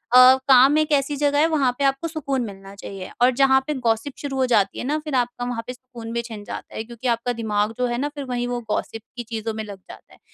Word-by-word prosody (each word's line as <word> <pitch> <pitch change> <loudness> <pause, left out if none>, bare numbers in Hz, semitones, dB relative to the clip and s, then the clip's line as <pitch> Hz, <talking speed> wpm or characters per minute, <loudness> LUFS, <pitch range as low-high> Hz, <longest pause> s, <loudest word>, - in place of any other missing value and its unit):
अ, 255 +1 +9
काम 270 +2 +7
एक 310 0 +1
ऐसी 285 0 +2
जगह 285 0 +1
है, 315 - +5
वहाँ 290 -6 +2
पे 280 - -1
आपको 270 +4 +1
सुकून 285 -5 -2
मिलना 195 -1 -10
चाहिए। 195 -2 -8
और 245 - +7
जहाँ 265 -1 +6
पे 300 - 0
गॉसिप 225 +4 +1
शुरू 275 -2 -4
हो 260 - +3
जाती 205 -6 +2
है - - -3
ना, 295 +3 0
फिर 300 -3 -3
आपका 245 -1 -1
वहाँ 245 -2 -3
पे 250 - -4
सुकून 245 -3 -10
भी 235 - 0
छिन 225 -3 -9
जाता - - -8
है, 220 - -3
क्योंकि 235 +2 -7
आपका 235 +1 0
दिमाग 215 -2 -1
जो 250 - +1
है 240 0 -2
ना, 285 +4 -1
फिर 285 - -5
वहीं 245 -1 -2
वो 245 0 -2
गॉसिप 225 +1 -2 0.2
की 240 - -3
चीज़ों 225 -1 -3
में 220 0 -4
लग 205 -2 -8
जाता - - -13
है। - - -20
245 Hz, 265 wpm, -23 LUFS, 225-275 Hz, 0.2 s, अ